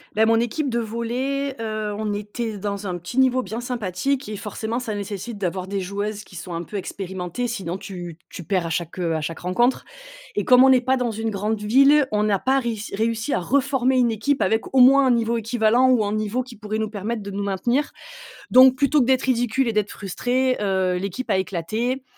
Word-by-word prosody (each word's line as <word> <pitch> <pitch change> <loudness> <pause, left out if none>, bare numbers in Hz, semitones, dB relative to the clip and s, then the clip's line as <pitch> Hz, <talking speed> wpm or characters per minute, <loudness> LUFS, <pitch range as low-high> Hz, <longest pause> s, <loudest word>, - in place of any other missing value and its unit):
Bah 220 - +4
mon 225 0 +4
équipe 270 +5 -1
de 235 -1 0
volley, 250 +5 -2
heu, 215 -2 -3
on 215 -1 -2
était 210 +1 -4
dans 200 0 -4
un 180 - -3
petit 175 +9 -4
niveau 255 -1 +3
bien 220 +4 -5
sympathique 245 +2 -2
et 210 - -5
forcément 220 +4 -4
ça 220 -4 -4
nécessite 205 +2 -5
d'avoir 185 -1 -3
des 200 0 -2
joueuses 205 +2 -4
qui 185 - -16
sont 175 +1 -7
un 165 - -3
peu 205 - -6
expérimentées. 190 +3 -4
Sinon 190 -6 -4
tu 175 -4 -8
tu 175 - -8
perds 185 -1 0
à - - -3
chaque, 170 +1 -3
heu 165 -2 0
à 155 - -2
chaque 160 +1 -5
rencontre. 240 +9 +1 0.5
Et 205 - -1
comme 250 0 +7
on 265 - +6
n'est 255 -1 +5
pas 260 +1 +1
dans 245 -2 -1
une 225 +1 -3
grande 210 +1 -2
ville, 275 +6 +5
on 210 0 +1
n'a 205 -2 +2
pas 265 +5 +2
réuss 225 -4 -4
réussi 225 +5 -1
à - - +1
reformer 265 - +1
une 245 -2 +3
équipe 270 +6 0
avec 220 +6 0
au 265 - +4
moins 270 +2 +7
un - - +4
niveau 235 0 +1
équivalent 230 +2 +2
ou 240 -5 +3
un 205 - -2
niveau 215 +3 -1
qui 250 -1 -10
pourrait 215 0 -4
nous 220 - -1
permettre 215 +2 -4
de 200 0 -7
nous 200 +1 -3
maintenir. 240 +9 0 0.6
Donc 255 0 +7
plutôt 280 +2 +3
que - - +2
d'être 260 +1 +2
ridicule 245 0 +1
et 230 - 0
d'être 210 -1 0
frustrée, 250 +6 -1
heu, 190 -2 +1
l'équipe 200 +6 -5
a 190 - +3
éclaté 215 +9 -2
220 Hz, 220 wpm, -23 LUFS, 200-250 Hz, 0.6 s, comme